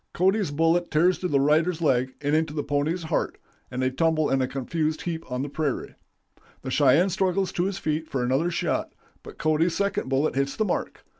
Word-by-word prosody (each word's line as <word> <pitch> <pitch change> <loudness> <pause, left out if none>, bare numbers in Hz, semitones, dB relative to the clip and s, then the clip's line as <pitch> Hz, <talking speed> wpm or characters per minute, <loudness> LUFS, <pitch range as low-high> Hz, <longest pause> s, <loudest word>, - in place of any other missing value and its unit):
Cody's 190 0 +2
bullet 165 +4 +1
tears 175 +4 +3
through 180 - -2
the 140 - +2
rider's 155 +4 +2
leg 130 -5 +1
into 150 +1 0
the 145 - -1
pony's 150 +5 -1
heart, 160 0 -1 0.3
and 125 +1 -3
they 130 - +1
tumble 155 +2 +1
in 135 0 +2
a 130 - +1
confused 155 +4 -2
heap 165 -5 -5
on 125 +1 -1
the - - -3
prairie. 145 -1 -3 0.7
The 130 - -4
Cheyenne 145 +7 +4
struggles 190 +1 0
to 175 - -1
his 195 0 -2
feet 155 +1 -2
for 130 -2 -2
another 135 +7 +1
shot, 170 - -2 0.3
but - - -12
Cody's 160 +2 +1
second 200 -8 -1
bullet 135 +3 +1
hits 140 +1 -1
the 220 - 0
mark. - - -3
155 Hz, 200 wpm, -25 LUFS, 140-175 Hz, 0.7 s, Cheyenne